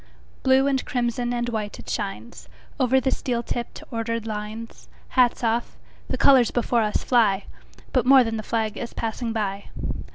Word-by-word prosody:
Blue 265 +1 +4
and 270 -2 +1
crimson 240 -1 -1
and 240 0 -1
white 215 -3 -3
it - - -12
shines, 210 +3 -5 0.3
Over 260 0 +4
the 265 0 0
steel 240 -3 -1
tipped, 240 0 -5
ordered 230 -1 -2
lines. 215 +1 -6 0.2
Hats 250 -2 +3
off! 230 +1 0 0.3
The - - -2
colors 260 -4 +6
before 240 -1 +1
us 210 -1 0
fly; 210 -6 +3 0.5
But 250 -2 +2
more 265 -1 +8
than 225 -1 -2
the - - -3
flag 220 0 -2
is 235 - -5
passing 230 +1 -3
by. 200 -3 -2
235 Hz, 165 wpm, -24 LUFS, 220-245 Hz, 0.5 s, more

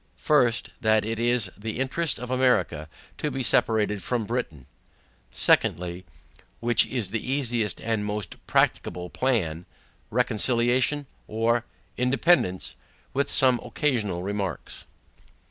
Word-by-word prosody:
First, 125 -7 +2
That 110 -1 +3
it 115 0 -3
is 120 -5 +1
the 110 +2 -5
interest 140 +4 0
of 125 +1 -6
America 125 - +1 0.3
to 150 - -1
be 135 -2 -3
separated 105 -4 +1
from 115 +4 -2
Britain. 85 - -4 0.6
Secondly, 90 +1 +1 0.5
Which 120 -2 +3
is 115 -7 -3
the 115 -1 -2
easiest 120 -7 0
and 110 -2 -1
most 105 -1 -4
practicable 90 0 0
plan, 90 -11 -1 0.4
RECONCILIATION 125 +4 +1 0.2
or 115 +2 0 0.3
INDEPENDANCE? 125 - +2 0.4
with 140 +1 0
some 130 -2 +6
occasional 115 -8 -1
remarks. 100 -1 -4
115 Hz, 110 wpm, -25 LUFS, 105-125 Hz, 0.6 s, some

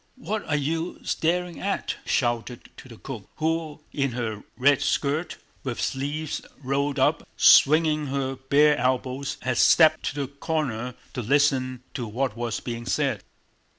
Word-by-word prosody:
"What 215 -4 -3
are 150 - +2
you 160 +4 -2
staring 175 +1 -1
at?" 195 0 -2
he - - -11
shouted 120 -1 -1
to 130 - -12
the 115 - -11
cook, 115 -6 -8
who 160 -1 -2
in 140 -3 0
her 110 -4 -3 0.2
red 140 +2 +4
skirt, 145 +3 -1 0.3
with 125 -4 -4
sleeves 145 +3 -2 0.2
rolled 140 +2 0
up, 130 - +2
swinging 155 0 +5
her 135 -1 -2
bare 145 +3 +4
elbows, 130 +2 -1
had 130 -2 0
stepped 155 -1 +6
to 145 - -2
the 135 - -2
corner 135 -4 -3 0.2
to 125 - -3
listen 130 0 +1
to 120 -4 -4
what 125 +2 -2
was 115 -2 -3
being 120 -1 -6
said. - - 0
140 Hz, 150 wpm, -25 LUFS, 125-155 Hz, 0.3 s, stepped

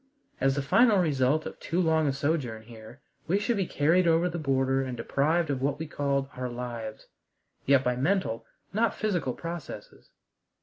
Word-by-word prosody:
As 135 0 +2
the 140 - -1
final 220 - +5
result 150 -3 +2
of - - -7
too 170 - -2
long 160 -3 +2
a - - +2
sojourn 135 -6 -2
here, 115 +3 -13 0.3
we 180 +5 +2
should 230 +3 0
be 195 -4 -1
carried 170 +5 +2
over 165 +2 +3
the 170 0 -4
border 135 -2 +1
and 130 -2 -4
deprived 150 +7 +1
of 130 -2 -2
what 140 +1 0
we 160 - -4
called 140 -2 -1
"our 125 0 -3
lives," 120 -3 -6 0.6
yet 135 -1 +5
by 125 -1 +1
mental, 140 - 0 0.3
not 220 +1 +1
physical, 180 -12 -1
processes. 170 -2 -8
140 Hz, 175 wpm, -28 LUFS, 130-170 Hz, 0.6 s, final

